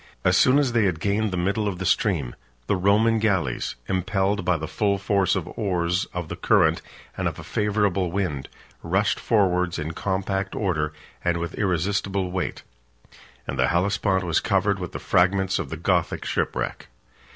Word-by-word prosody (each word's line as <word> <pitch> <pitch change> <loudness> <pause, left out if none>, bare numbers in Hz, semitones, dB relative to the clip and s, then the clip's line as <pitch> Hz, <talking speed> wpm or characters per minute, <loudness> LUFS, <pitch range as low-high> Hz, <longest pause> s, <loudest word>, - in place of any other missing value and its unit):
As - - +3
soon 130 +2 +5
as 140 -4 +2
they 115 -3 +3
had 90 -5 0
gained 105 +3 0
the 90 - -3
middle 100 +4 0
of 95 -3 -2
the 95 - -4
stream, 80 - +1 0.3
the 100 - +1
Roman 105 +4 +3
galleys, 95 - 0
37 95 - -1
impelled 95 +1 0
by 90 -2 +2
the 80 0 -5
full 100 +2 0
force 100 -1 +1
of - - -3
oars, 90 -2 0
of 90 -2 -6
the - - -5
current, - - +3 0.3
and - - -1
of - - -4
a - - -8
favorable 100 -3 0
wind, 85 -8 -2 0.3
rushed 95 +3 +1
forwards 90 -5 +1
in 80 -1 -3
compact 95 +2 -2
order, 80 -7 0 0.3
and 85 -1 +1
with 85 0 -4
irresistible 95 0 -1
weight; 95 0 -3 0.8
and 70 0 -5
the 65 - +4
Hellespont 95 +1 +1
was 85 -2 +1
covered 100 0 +1
with 90 -2 -5
the - - -3
fragments 95 +1 +2
of - - -4
the 80 - -5
Gothic 85 0 0
shipwreck. - - -2
95 Hz, 175 wpm, -24 LUFS, 90-100 Hz, 0.8 s, soon